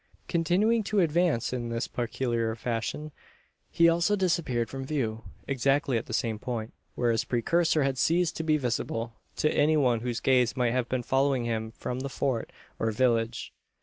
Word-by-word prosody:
Continuing 190 +7 +2
to 210 0 +1
advance 170 -8 +2
in 120 -2 -3
this 115 +1 -2
peculiar 120 -1 -1
fashion, 120 +6 -3 0.6
he 170 - +4
also 170 +5 +3
disappeared 170 - 0
from 135 0 -6
view 115 -6 -2 0.2
exactly 135 +1 +1
at 115 - -2
the - - -8
same 110 -3 -1
point, 115 -2 -4 0.2
where 120 -1 +2
his 115 - +1
precursor 160 +6 +1
had 135 -2 -1
ceased 170 +1 +2
to - - -1
be 155 -1 +3
visible 115 -3 -2 0.2
to 155 - +1
any 155 +2 +3
one 125 -5 +3
whose 120 0 -3
gaze 125 -2 +2
might 120 -2 +2
have 125 -1 -1
been 130 -1 -1
following 135 -1 +1
him 110 -1 -2
from 125 +2 -5
the 135 +1 -4
Fort 130 -3 -2 0.3
or 115 - +1
village. 115 0 0
130 Hz, 175 wpm, -28 LUFS, 115-155 Hz, 0.6 s, he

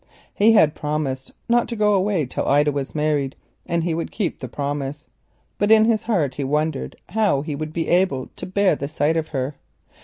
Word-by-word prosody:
He 220 +2 +5
had 160 -9 +5
promised 150 -3 -3 0.2
not 240 0 +3
to 235 - -4
go 210 -1 +3
away 190 -5 +1
till 125 - -3
Ida 145 +1 +4
was 140 0 -4
married 150 -3 0 0.3
and 170 -1 0
he 170 -1 0
would 165 +1 -3
keep 200 -6 -2
the 130 - -5
promise, 145 +3 -4 0.5
but 205 - +2
in 220 0 +7
his 225 -2 +2
heart 170 - +1
he 140 - -4
wondered 150 +1 -1
how 200 -9 +1
he 150 -2 -4
should 155 -1 -1
bear 200 -5 +4
the 140 - -4
sight 155 +1 0
of 160 -1 -1
her. 135 0 -3
155 Hz, 185 wpm, -22 LUFS, 140-195 Hz, 0.5 s, in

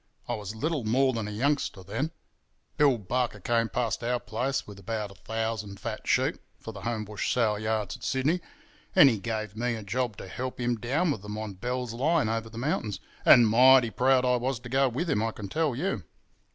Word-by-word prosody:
I - - -1
was 105 0 -5
little 150 +3 -1
more 130 +4 +2
than 110 -2 -3
a - - -5
youngster 125 -3 -1
then—Bill 125 - -2
Barker 115 +2 -2
came 115 +3 +1
past 115 +3 -1
our 120 +1 0
place 135 +3 -2
with 100 -1 -11
about 105 0 -4
a - - -11
thousand 110 -1 -4
fat - - -5
sheep - - +2 0.2
for 115 - -7
the 100 -3 -10
Homebush 110 -2 -2
sale 110 -4 +2
yards 110 +3 -2
at 120 - -17
Sydney, 145 +7 +1 0.5
and 140 -2 +8
he 110 - -2
gave 110 -1 -4
me 120 +1 -1
a 110 - -7
job 115 +1 -2
to - - -8
help 125 +7 -5
him 120 -1 0
down 145 +10 0
with 110 - -3
them 105 +1 -6
on 110 -2 -5
Bell's 125 +4 -3
Line 145 0 +2
over 115 0 -2
the 115 - -11
mountains, 115 -5 -1 0.3
and 120 -2 +8
mighty 125 +1 +6
proud 130 +1 +3
I 125 0 +3
was 125 0 -2
to 120 - -9
go 135 +1 +3
with 140 +9 -2
him, 140 -9 +1
I 115 0 0
can 105 -2 -8
tell 155 -2 0
you. 145 - -2
115 Hz, 205 wpm, -28 LUFS, 110-130 Hz, 0.5 s, and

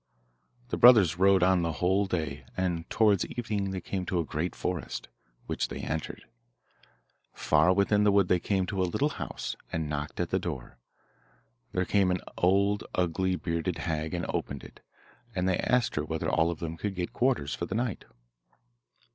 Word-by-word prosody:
The - - -2
brothers 105 -9 +7
rode 95 -1 +5
on 95 -1 +4
the 85 -1 -1
whole 95 +5 +1
day, 75 -6 -3
and 90 -2 -1
towards 105 -4 +3
evening 105 -5 -3
they 95 -1 -4
came 95 -2 -3
to 90 - 0
a 85 - 0
great 80 +4 -3
forest, 90 -3 -4 0.4
which - - -2
they - - -6
entered. 80 0 -4 1.1
Far 90 - +3
within 100 +2 +3
the 105 - +5
wood 100 -2 +4
they 90 - +3
came 95 0 0
to 95 0 -2
a - - +3
little 145 - +1
house, - - -4 0.2
and 80 -2 -2
knocked 75 0 -4
at 90 - -1
the 95 - +2
door. 70 -8 -6 0.9
There 90 0 0
came 100 -1 +2
an 90 -1 0
old, 100 +3 +2
ugly, 90 +1 +1
bearded 85 0 -2
hag, 80 0 -2
and 85 - -2
opened 70 -2 -3
it, - - -13 0.6
and 90 0 0
they 95 - +1
asked 125 -1 +1
her 75 - -1
whether 80 +1 -3
all 85 0 +3
of 85 - -3
them 80 0 -5
could 100 +2 -3
get 90 -1 -3
quarters 120 - +1
for 85 - -4
the 95 - -4
night. 115 -3 -2
90 Hz, 180 wpm, -29 LUFS, 80-100 Hz, 1.1 s, brothers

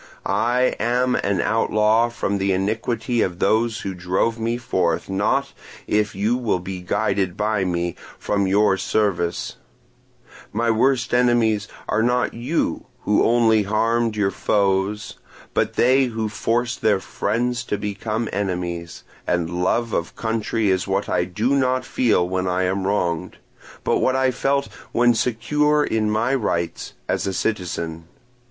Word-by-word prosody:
I 125 +2 +1
am 125 +2 +1
an 100 -3 0
outlaw 110 +1 +2
from 100 -4 -2
the 95 0 +1
iniquity 115 +4 -1
of 90 -2 -1
those 110 +3 +1
who 95 - -4
drove 95 +6 -1
me 115 +1 -1
forth, 95 -10 -1
not, 100 +2 0 0.3
if 105 -1 0
you 105 +5 +1
will 120 -6 0
be 90 +1 -6
guided 100 -1 -1
by 105 -2 0
me, 85 -1 -1 0.2
from 100 -2 0
your 100 0 +3
service; 90 -3 -1 0.9
my 115 +2 +1
worst 125 +2 +1
enemies 120 -4 +3 0.2
are 110 - +1
not 125 +2 +1
you 125 +6 -2
who 105 - +2
only 115 -2 +4
harmed 115 +2 +1
your 100 -2 +1
foes, 100 +1 0 0.3
but - - 0
they 130 +2 +4
who 110 -3 -3
forced 120 +3 -1
their 105 -3 +3
friends 120 +5 -1
to 105 - -2
become 110 +3 -3
enemies; 90 -4 -3 0.2
and 85 0 -1
love 115 +4 0
of 85 - -2
country 110 -2 0
is 95 -1 0
what 95 +1 -1
I 90 - +1
do 110 +9 0
not 130 -1 +1
feel 105 -8 +2
when 95 0 -1
I 90 +1 +1
am 95 +1 -1
wronged, 85 -5 -1 0.5
but - - +1
what 130 - +2
I 130 -1 +2
felt 140 +2 0 0.3
when 120 0 +4
secure 150 +6 +1
in 110 -5 0
my 110 +5 +1
rights 85 -9 -2
as - - -1
a 95 - -1
citizen. 85 -5 -3
110 Hz, 145 wpm, -22 LUFS, 95-120 Hz, 0.9 s, only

